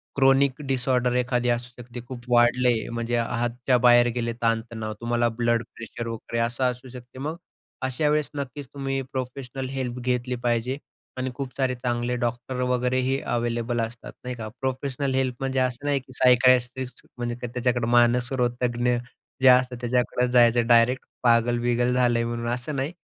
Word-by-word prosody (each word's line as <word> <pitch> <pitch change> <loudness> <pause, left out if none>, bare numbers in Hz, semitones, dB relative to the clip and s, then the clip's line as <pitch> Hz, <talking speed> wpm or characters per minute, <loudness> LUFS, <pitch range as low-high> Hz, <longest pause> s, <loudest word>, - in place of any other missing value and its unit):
Chronic 135 0 +3
disorder 125 -1 +1
एखादी 125 -1 +1
असू 120 +1 -1
शकते. 120 0 -9
खूप 120 -2 -8
वाढले 120 +1 +4 0.2
म्हणजे 115 +1 -1
हाताच्या 120 +2 0
बाहेर 120 0 +7
गेले 115 -1 -1
ताण-तणाव. 115 -1 -1
तुम्हाला 120 0 +1
ब्लड 120 -1 +1
प्रेशर 115 +1 -7
वगैरे 115 0 -4
असं 120 +2 -1
असू 125 +2 -11
शकते. 125 +1 -11
मग 155 +4 -3 0.5
अशा 150 +4 0
वेळेस 150 -1 +1
नक्कीच 140 0 -5
तुम्ही 135 -1 -2
प्रोफेशनल 130 0 -5
हेल्प 130 -2 -3
घेतली 125 0 -1
पाहिजे. 120 +2 0 0.4
आणि 130 0 -2
खूप 135 -2 -4
सारे 130 -2 +1
चांगले 120 0 -1
डॉक्टर 120 +2 -3
वगैरेही 130 +2 +1
अवेलेबल 120 0 -1
असतात, 115 +1 -6
नाही 125 0 -4
का. 110 -2 -6
प्रोफेशनल 130 +1 -2
हेल्प 130 -2 0
म्हणजे 135 0 -1
असं 130 +2 -1
नाही 140 -1 +2
की 130 - -17
सायकायट्रिस्ट 125 0 +3
म्हणजे 120 -1 -3
त्य 125 - -3
त्याच्याकडे 125 -1 0
मानसरोगतज्ञ 120 0 +2 0.5
जे 130 - +5
असतात 125 0 +4
त्याच्याकडे 125 0 +1
जायचं 120 -1 +4
डायरेक्ट 120 +2 +4 0.2
पागल-बिगल 120 +1 +2
झालंय 120 -2 +2
म्हणून 120 0 -3
असं 125 +5 -3
नाही. 140 +5 -2
125 Hz, 155 wpm, -25 LUFS, 120-130 Hz, 0.5 s, बाहेर